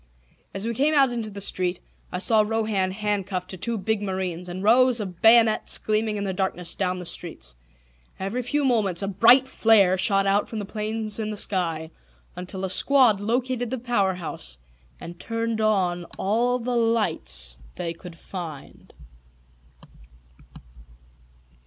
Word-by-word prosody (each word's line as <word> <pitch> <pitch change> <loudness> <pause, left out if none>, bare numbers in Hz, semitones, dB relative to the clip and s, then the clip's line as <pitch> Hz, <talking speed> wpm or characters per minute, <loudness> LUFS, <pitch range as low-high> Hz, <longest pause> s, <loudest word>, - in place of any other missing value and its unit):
As 195 +2 -5
we 235 - -1
came 290 +6 +1
out 270 -3 +4
into 230 -3 -4
the 200 -1 -8
street. 180 -2 -1 0.3
I - - -3
saw 215 +4 +3
Rohan 215 -3 0
handcuffed 195 -2 -3
to 185 - -7
two 235 +5 -3
big 215 +1 -1
marines, 185 -3 -4
and 185 +2 -6
rows 245 +3 +4
of 185 -5 -6
bayonets 225 -1 +5
gleaming 215 0 -1
in 200 - -3
the 195 -1 -2
darkness 180 -2 -2
down 185 -1 -1
the 180 - -7
streets. 165 - -5 0.6
Every 195 +6 -3
few 285 +4 -1
moments 210 -8 +1
a - - -1
bright 240 +7 +5
flare 200 -7 +3
shot 195 -1 +2
out 200 +1 +1
from 225 - -6
the 205 - -4
planes 215 +1 -3
in 215 -1 -2
the 210 - -4
sky, 165 -5 -1 0.4
until 185 +2 -5
a - - -3
squad 255 -4 +5
located 245 +3 -1
the 260 - -3
power 225 -6 0
house 60 - -4 0.4
and 175 0 -10
turned 230 0 -2
on 185 -5 +1
all 235 +5 +1
the 250 0 -3
lights 65 - 0 0.2
they 170 -1 -4
could 170 0 -12
find. 165 -6 -9
205 Hz, 155 wpm, -24 LUFS, 180-230 Hz, 0.6 s, bayonets